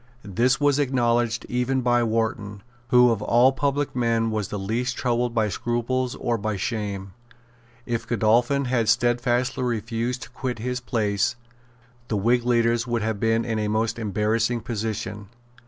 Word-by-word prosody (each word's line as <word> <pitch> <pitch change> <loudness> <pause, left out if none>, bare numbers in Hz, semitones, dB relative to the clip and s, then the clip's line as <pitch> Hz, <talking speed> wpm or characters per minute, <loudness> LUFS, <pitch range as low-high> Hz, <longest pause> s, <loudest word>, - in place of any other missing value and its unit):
This 120 +6 +1
was 145 -1 +3
acknowledged 120 -4 +1
even 125 +2 0
by 120 -1 +2
Wharton, 110 -3 -2 0.2
who 125 0 +5
of 110 -3 -1
all 120 +4 +4
public 140 0 -1
men 115 -2 +1
was 105 -3 -2
the 105 - -5
least 115 +6 -2
troubled 120 -1 0
by 110 -2 +2
scruples 120 +4 -1
or 120 -1 -1
by 105 +1 -2
shame. 100 -2 -4 0.7
If 115 -1 -3
Godolphin 120 +4 +2
had 120 -3 +1
stedfastly 120 +2 +1
refused 115 +1 -2
to - - -12
quit 125 -1 -4
his 125 +3 -3
place, 110 -1 0 0.7
the 110 - -1
Whig 120 +4 +2
leaders 120 0 +2
would 120 -2 -1
have 110 -2 -2
been 115 +1 +1
in 110 -2 -1
a 105 - -1
most 110 +2 -1
embarrassing 110 +3 0
position. 105 -2 -4
115 Hz, 155 wpm, -24 LUFS, 110-125 Hz, 0.7 s, who